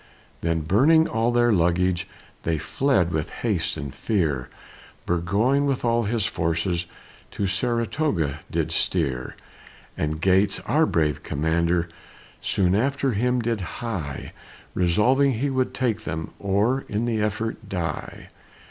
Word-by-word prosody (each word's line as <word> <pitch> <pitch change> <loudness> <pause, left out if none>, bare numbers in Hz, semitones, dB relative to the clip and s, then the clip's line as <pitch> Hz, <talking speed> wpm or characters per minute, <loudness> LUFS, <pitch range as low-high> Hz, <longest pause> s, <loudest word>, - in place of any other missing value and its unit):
Then, 85 -1 0
burning 140 - +4
all 115 +2 +1
their 120 -1 +3
luggage, 90 +1 +2 0.3
They 80 -1 0
fled 95 - +1
with 75 -2 -1
haste 100 -9 -1
and 70 -3 -5
fear, 75 - -1 0.6
Burgoyne 105 +12 +1
with 135 -3 -1
all 115 -1 +2
his 110 -1 0
forces, 85 -2 -1 0.4
To 100 - -3
Saratoga 110 - 0
did - - -1
steer; 65 -2 0 0.6
And 75 0 -2
Gates, 95 +3 +3
our 155 +7 +2
brave 75 -4 +1
commander, 85 +3 0 0.5
Soon 90 -2 +2
after 135 +5 +1
him 125 +3 +1
did 115 -3 -1
hie, 90 - -5 0.4
Resolving 125 +10 +3
he 135 +5 -1
would 130 -1 0
take 115 -4 -1
them, 80 +1 -4
Or 105 +7 +1
in 105 +3 -1
the 115 -3 0
effort 110 0 -3
die. 85 -5 -4
100 Hz, 130 wpm, -24 LUFS, 85-120 Hz, 0.6 s, burning